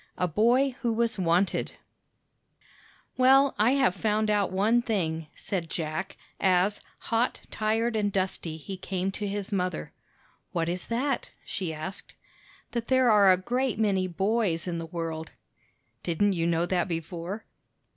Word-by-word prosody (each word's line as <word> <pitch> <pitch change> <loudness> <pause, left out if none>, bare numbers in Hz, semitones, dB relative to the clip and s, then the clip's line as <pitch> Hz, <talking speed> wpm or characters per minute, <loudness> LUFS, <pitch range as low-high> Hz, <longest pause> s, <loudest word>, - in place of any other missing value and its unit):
A 180 - +1
BOY 240 - +3
WHO 235 -2 +1
WAS 230 -2 0
WANTED 180 +2 +1 1.4
"Well, 270 +2 +6
I 225 +5 +5
have 265 -9 +3
found 215 +2 +1
out 205 -3 +1
one 215 +6 +3
thing," 165 -9 -1
said 175 -5 -3
Jack 155 +3 -4 0.2
as, 190 +2 +2 0.2
hot, 230 +2 0
tired, 225 +2 0
and 205 -2 +1
dusty, 185 -4 -2
he 185 +5 -7
came 185 +1 -2
to 205 +1 -4
his 200 +1 -3
mother. 180 - -2 0.6
"What 165 -1 0
is 175 0 -3
that?" 255 +3 -1 0.2
she 185 -4 -3
asked. 160 +5 -6 0.6
"That 235 -1 -3
there 260 -2 +4
are 200 -3 +7
a 185 - +5
great 245 +5 -1
many 195 -4 +2
boys 190 -2 0
in 170 -1 -2
the 165 - -5
world." 160 -1 -5 0.7
"Didn't 195 +4 +1
you 170 -2 0
know 170 0 +2
that 180 0 0
before?" 170 +4 -5
195 Hz, 145 wpm, -28 LUFS, 175-225 Hz, 1.4 s, are